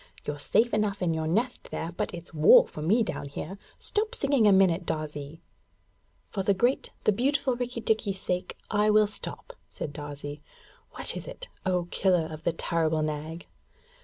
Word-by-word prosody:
You're 145 Hz, 0 st, -3 dB
safe 235 Hz, +10 st, +2 dB
enough 205 Hz, -2 st, 0 dB
in 170 Hz, -2 st, +2 dB
your 160 Hz, 0 st, -1 dB
nest 230 Hz, +9 st, -1 dB
there, 165 Hz, -, -4 dB
but 175 Hz, -, -3 dB
it's 175 Hz, 0 st, -8 dB
war 155 Hz, 0 st, +8 dB
for 150 Hz, -, -8 dB
me 210 Hz, +10 st, +3 dB
down 145 Hz, -, -4 dB
here. 175 Hz, +7 st, -6 dB, 0.2 s
Stop 435 Hz, +3 st, -2 dB
singing 275 Hz, -, +3 dB
a -, -, +7 dB
minute, 190 Hz, -2 st, +4 dB
Darzee.' 155 Hz, 0 st, -5 dB, 0.9 s
'For 195 Hz, -, -1 dB
the 195 Hz, +1 st, +2 dB
great, 240 Hz, +7 st, +1 dB
the -, -, +5 dB
beautiful 260 Hz, +3 st, +1 dB
Rikki 245 Hz, -1 st, -3 dB
tikki's 210 Hz, -3 st, 0 dB
sake 180 Hz, 0 st, -3 dB
I 210 Hz, 0 st, +3 dB
will 215 Hz, 0 st, +6 dB
stop,' 210 Hz, -, -8 dB, 0.2 s
said 145 Hz, -, -6 dB
Darzee. 145 Hz, 0 st, -7 dB, 0.5 s
'What -, -, -3 dB
is -, -, -6 dB
it, -, -, -8 dB, 0.2 s
O 180 Hz, -2 st, +1 dB
killer 180 Hz, -4 st, +2 dB
of 155 Hz, +1 st, -9 dB
the 170 Hz, -, +3 dB
terrible 160 Hz, -1 st, 0 dB
Nag?' 155 Hz, +2 st, -4 dB
185 Hz, 175 wpm, -28 LUFS, 155-220 Hz, 0.9 s, war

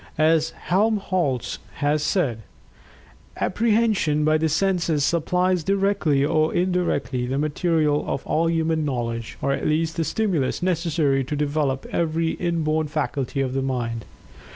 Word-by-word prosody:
As 160 Hz, +1 st, +3 dB
Helmholtz 185 Hz, -, 0 dB, 0.2 s
has 145 Hz, +1 st, +1 dB
said, 145 Hz, -, 0 dB, 1.0 s
"Apprehension 210 Hz, -8 st, +1 dB
by 155 Hz, 0 st, +3 dB
the 160 Hz, 0 st, +1 dB
senses 170 Hz, -2 st, +1 dB
supplies 180 Hz, +2 st, +1 dB
directly 195 Hz, -7 st, +1 dB
or 155 Hz, +1 st, +2 dB
indirectly, 175 Hz, -8 st, 0 dB
the 135 Hz, +2 st, -1 dB
material 155 Hz, 0 st, +1 dB
of -, -, -3 dB
all 165 Hz, +1 st, +1 dB
human 160 Hz, -1 st, 0 dB
knowledge, 115 Hz, -5 st, -3 dB
or 140 Hz, -, +1 dB
at 140 Hz, -, -1 dB
least 160 Hz, +2 st, 0 dB
the 165 Hz, -, +1 dB
stimulus 175 Hz, -, -1 dB
necessary 160 Hz, -6 st, +1 dB
to 150 Hz, -, -3 dB
develop 145 Hz, -2 st, -1 dB
every 165 Hz, 0 st, 0 dB
inborn 160 Hz, -3 st, -1 dB
faculty 145 Hz, -3 st, -2 dB
of 130 Hz, -1 st, -1 dB
the 135 Hz, -, 0 dB
mind." 120 Hz, -4 st, -3 dB
155 Hz, 130 wpm, -23 LUFS, 140-175 Hz, 1.0 s, As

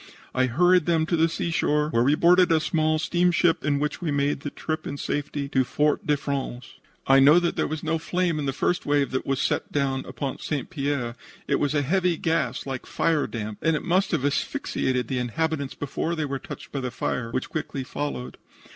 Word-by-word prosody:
I 130 Hz, 0 st, +2 dB
hurried 175 Hz, +6 st, +3 dB
them 165 Hz, -2 st, +3 dB
to 170 Hz, -, 0 dB
the 165 Hz, 0 st, +3 dB
seashore, 150 Hz, -3 st, 0 dB
where 115 Hz, -, +2 dB
we 140 Hz, +5 st, +4 dB
boarded 180 Hz, +2 st, +5 dB
a 160 Hz, -, +5 dB
small 155 Hz, 0 st, +1 dB
steamship, 175 Hz, +1 st, +2 dB
in 145 Hz, 0 st, +1 dB
which 150 Hz, +3 st, -2 dB
we 170 Hz, -, -2 dB
made 145 Hz, 0 st, +1 dB
the 145 Hz, -, -5 dB
trip 155 Hz, +2 st, -4 dB
in 145 Hz, -, -4 dB
safety 145 Hz, 0 st, -3 dB
to 130 Hz, -1 st, +2 dB
Fort 150 Hz, +4 st, 0 dB
de 150 Hz, -1 st, +3 dB
France. 135 Hz, -3 st, -5 dB, 0.3 s
"I 135 Hz, 0 st, +6 dB
know 145 Hz, +5 st, +7 dB
that 175 Hz, -1 st, -1 dB
there -, -, 0 dB
was 155 Hz, -1 st, -4 dB
no 160 Hz, 0 st, 0 dB
flame 175 Hz, -1 st, 0 dB
in 145 Hz, -, -2 dB
the -, -, +1 dB
first 175 Hz, +6 st, 0 dB
wave 145 Hz, -2 st, +1 dB
that 130 Hz, -, -2 dB
was 135 Hz, -1 st, 0 dB
sent -, -, -1 dB
down 135 Hz, -2 st, 0 dB
upon 130 Hz, +1 st, -4 dB
St. 150 Hz, +4 st, -3 dB
Pierre. 140 Hz, -6 st, -2 dB, 0.3 s
It -, -, +1 dB
was 145 Hz, +1 st, 0 dB
a 145 Hz, -, +2 dB
heavy 180 Hz, +3 st, +1 dB
gas, 165 Hz, -2 st, -1 dB
like 135 Hz, -2 st, -5 dB
firedamp, 115 Hz, -10 st, -1 dB
and 165 Hz, -1 st, +2 dB
it -, -, -3 dB
must 185 Hz, +3 st, +2 dB
have 135 Hz, -, 0 dB
asphyxiated 130 Hz, -3 st, -1 dB
the 130 Hz, 0 st, -1 dB
inhabitants 140 Hz, +1 st, -2 dB
before 150 Hz, +5 st, -2 dB
they 155 Hz, -2 st, -1 dB
were 135 Hz, -1 st, -3 dB
touched -, -, -9 dB
by 140 Hz, -, -3 dB
the 130 Hz, -1 st, -2 dB
fire, 120 Hz, -1 st, -3 dB
which 130 Hz, +3 st, -3 dB
quickly 145 Hz, -3 st, -3 dB
followed. 130 Hz, -1 st, -5 dB
145 Hz, 210 wpm, -25 LUFS, 135-165 Hz, 0.3 s, know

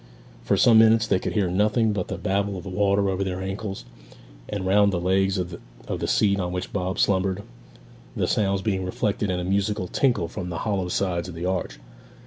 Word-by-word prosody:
For -, -, +1 dB
some 115 Hz, -2 st, +6 dB
minutes 110 Hz, 0 st, +5 dB
they 100 Hz, -3 st, +1 dB
could -, -, -3 dB
hear 100 Hz, -4 st, +1 dB
nothing 105 Hz, +3 st, +2 dB
but 95 Hz, -3 st, -2 dB
the -, -, -4 dB
babble 100 Hz, -1 st, -1 dB
of 90 Hz, -, -7 dB
the 95 Hz, -, -7 dB
water 100 Hz, +1 st, +2 dB
over 95 Hz, 0 st, 0 dB
their 95 Hz, -1 st, -3 dB
ankles, 95 Hz, +1 st, -5 dB, 0.6 s
and 100 Hz, -2 st, -3 dB
round 100 Hz, +1 st, +4 dB
the 90 Hz, -, -1 dB
legs 95 Hz, +2 st, +1 dB
of 90 Hz, -2 st, -4 dB, 0.3 s
the -, -, -3 dB
seat 100 Hz, -2 st, +2 dB
on 90 Hz, -1 st, -2 dB
which 90 Hz, 0 st, -5 dB
Bob 95 Hz, -2 st, -2 dB
slumbered, 95 Hz, 0 st, +1 dB, 0.7 s
the -, -, 0 dB
sounds 100 Hz, -2 st, +1 dB
being 95 Hz, -3 st, -1 dB
reflected 100 Hz, +2 st, -1 dB
in 90 Hz, -1 st, -1 dB
a -, -, -3 dB
musical 100 Hz, 0 st, 0 dB
tinkle 120 Hz, -5 st, +1 dB
from 90 Hz, +1 st, -6 dB
the 85 Hz, -, -4 dB
hollow 100 Hz, -4 st, 0 dB
sides 90 Hz, -1 st, -1 dB
of 85 Hz, -, -9 dB
the 85 Hz, +2 st, -4 dB
arch. 95 Hz, 0 st, -2 dB
95 Hz, 205 wpm, -24 LUFS, 90-100 Hz, 0.7 s, some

